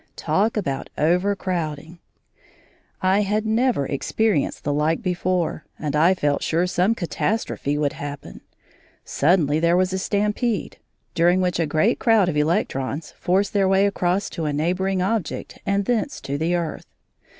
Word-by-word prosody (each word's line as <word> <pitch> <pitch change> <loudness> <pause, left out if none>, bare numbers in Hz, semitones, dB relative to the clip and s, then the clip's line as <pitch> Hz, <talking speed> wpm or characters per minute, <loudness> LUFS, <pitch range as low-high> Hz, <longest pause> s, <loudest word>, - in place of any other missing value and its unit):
Talk 215 +4 0
about 140 -9 -3
overcrowding! 170 -2 -1 1.0
I 190 +2 +3
had 210 +2 0
never 225 - +1
experienced 155 +5 -1
the 145 - 0
like 155 +3 0
before, 180 -3 -1
and 150 -2 -3
I 170 +5 +4
felt 145 -5 0
sure 170 +2 +1
some 185 +4 +1
catastrophe 170 -5 -2
would 145 -2 0
happen. 145 -1 -8 0.6
Suddenly 155 -1 +2
there 170 +2 +3
was 185 0 +1
a 190 - -1
stampede, 210 +3 -1 0.3
during 175 +1 +3
which 180 -2 0
a 165 - +1
great 160 +11 +1
crowd 225 -6 +4
of 160 - -2
electrons 150 -1 -1
forced 195 +4 +1
their 200 -2 +3
way 195 +1 +4
across 195 -1 0
to 165 -4 -4
a 150 - -1
neighbouring 185 +5 0
object 200 -2 -3
and 200 0 +1
thence 245 +5 -1
to 140 - -4
the 165 +4 0
earth. 170 -2 -4
180 Hz, 150 wpm, -22 LUFS, 155-200 Hz, 1.0 s, I